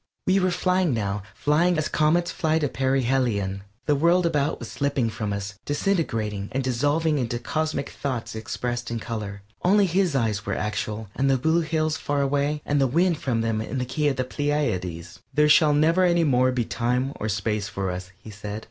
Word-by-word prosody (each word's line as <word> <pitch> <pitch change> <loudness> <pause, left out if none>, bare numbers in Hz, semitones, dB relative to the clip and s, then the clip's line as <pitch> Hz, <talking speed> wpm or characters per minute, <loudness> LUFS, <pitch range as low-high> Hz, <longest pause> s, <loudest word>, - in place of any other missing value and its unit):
We 190 +1 +3
were 185 -1 +2
flying 180 -5 +1
now, 105 -2 -2
flying 165 +4 +2
as 155 - 0
comets 165 +3 +2
fly 160 -1 +1
to 150 -2 +1
perihelion. 125 -8 0 0.2
The 150 - +3
world 170 +5 +3
about 150 -3 +1
was - - -8
slipping 140 -5 0
from 105 -1 -3
us, 100 0 -5
disintegrating 115 - -1
and 135 +1 0
dissolving 145 +5 +1
into 120 -1 -1
cosmic 155 +4 -2
thoughts 120 -4 -4
expressed 120 +2 -4
in 115 0 -3
color. 105 -3 -5 0.2
Only 200 +3 +4
his 180 -3 +1
eyes 110 -6 0
were - - -2
actual, 105 0 -3
and 135 +1 +1
the 135 - +4
blue 160 +6 +2
hills 155 -1 0
far 145 -1 -1
away, 145 +2 0
and 145 -1 +1
the 135 - +4
wind 170 +5 +2
from 120 -4 0
them 115 -1 0
in 120 +4 -4
the 125 - -1
key 145 +4 0
of 140 - +1
the 130 - 0
Pleiades. 95 - -2 0.2
"There 150 0 +5
shall 150 0 +5
never 165 +5 +4
any 170 -1 +3
more 130 -3 +3
be 125 -2 -1
time 120 +5 -1
or 110 - -3
space 105 0 -1
for 100 -1 -3
us," 90 0 -6
he 110 - -12
said. 105 0 -6
135 Hz, 195 wpm, -25 LUFS, 110-155 Hz, 0.2 s, There